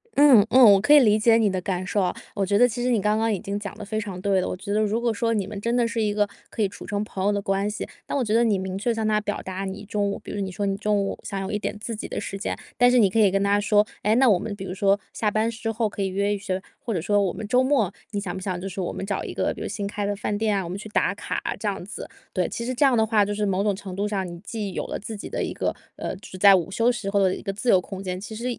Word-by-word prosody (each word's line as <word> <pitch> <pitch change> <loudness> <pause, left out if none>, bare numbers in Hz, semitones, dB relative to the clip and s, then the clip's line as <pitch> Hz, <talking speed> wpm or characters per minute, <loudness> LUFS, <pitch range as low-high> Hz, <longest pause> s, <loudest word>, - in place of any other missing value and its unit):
嗯 275 -8 +7
嗯， 260 - +5
我 195 - +4
可 255 - +1
以 295 - +10
理 215 -4 +4
解 225 +1 +5
你 215 -3 +3
的 185 -1 -2
感 185 0 -2
受 200 +2 0
啊， 180 -1 0 0.2
我 200 -2 0
觉 200 +2 +2
得 245 +3 +6
其 240 +1 -4
实 250 - +1
你 235 -4 +3
刚 210 +2 +1
刚 225 0 +1
已 200 - -1
经 200 0 -4
讲 205 -1 -7
得 210 - -7
非 215 +1 -2
常 195 -4 -6
对 195 0 +2
了。 - - -2
我 - - -4
觉 200 +2 -4
得 215 - +2
如 215 +2 +1
果 235 -1 0
说 230 +1 0
你 205 -3 0
们 200 +1 -6
真 235 +2 0
的 240 -1 +2
是 230 -1 -2
一 210 -1 +1
个 205 0 +2 0.2
可 220 - -4
以 - - +3
处 195 - -11
成 205 0 -2
朋 190 -3 -5
友 205 - +4
的 205 - 0
关 195 +1 0
系， 210 - -5 0.2
那 - - -3
我 270 - +1
觉 215 - -1
得 230 +1 +4
你 215 -4 +2
明 190 0 -4
确 220 +5 0
向 220 -1 -1
他 215 0 +2
表 205 0 -3
达 190 +1 -5
你 195 +2 -6
中 205 0 -1
午， - - -5
比 - - -8
如 205 - -4
你 190 -1 -3
说 200 +2 -3
你 195 -1 0
中 210 0 +1
午 195 - -3
想 200 -1 -4
有 195 - -4
一 210 - -1
点 210 - -4
自 225 +1 -5
己 210 - -6
的 - - -4
时 195 - -5
间， 200 - -3 0.2
但 245 0 +5
是 250 - +4
你 205 -5 +5
可 225 - 0
以 210 -2 +6
跟 195 +1 +1
他 205 +1 +3
说， 210 0 +3 0.2
哎， 215 +2 +2
那 260 +2 +5
我 190 -4 +4
们 210 +2 -4
比 200 - -8
如 180 - -5
说 200 +1 +2
下 215 - 0
班 215 +2 +1
之 225 0 -3
后 225 0 0
可 205 - -6
以 195 - +1
约 200 +2 0
一 205 - -3
约， 185 0 0 0.2
或 230 - -4
者 175 - 0
说 205 +4 +2
我 190 -3 +1
们 215 -1 -6
周 250 +3 +3
末， 260 -8 +2 0.2
你 205 - -2
想 190 -3 -4
不 190 - -6
想 185 -2 -3
就 190 - -5
是 190 0 -4
我 175 - -2
们 - - -5
找 195 -1 -2
一 - - -5
个， - - 0
比 - - -10
如 - - -3
新 205 0 -4
开 205 0 -3
的 205 - -1
饭 205 +1 -2
店 215 -1 +1
啊， 195 - -1
我 170 - -6
们 185 - -4
去 215 +2 -8
打 - - +1
卡 - - -4 0.2
这 - - -3
样 - - -2
子。 - - -8 0.2
对， - - 0
其 235 - -4
实 255 - -2
这 250 - +1
样 265 -4 +5
的 220 - +4
话， 215 -2 +3
就 205 - -2
是 210 - 0
某 195 0 +1
种 205 -1 +1
程 190 -1 -8
度 200 +2 -1
上， 195 -3 -2
你 175 -1 -8
既 205 0 -5
有 - - -3
了 - - -3
自 220 +2 -6
己 205 - -7
的 - - -2
一 - - -3
个， - - -1 0.2
呃， - - -4
只 185 0 -11
在 200 +1 +8
午 180 0 -1
休 230 +4 +3
时 220 -5 -4
候 200 - +2
的 185 -1 +2
一 - - -9
个 195 - -3
自 210 +5 -2
由 190 - +6
空 190 +1 -7
间， 185 -1 -4
其 215 +3 -8
实 235 - -6
205 Hz, 370 characters per minute, -24 LUFS, 195-220 Hz, 0.2 s, 以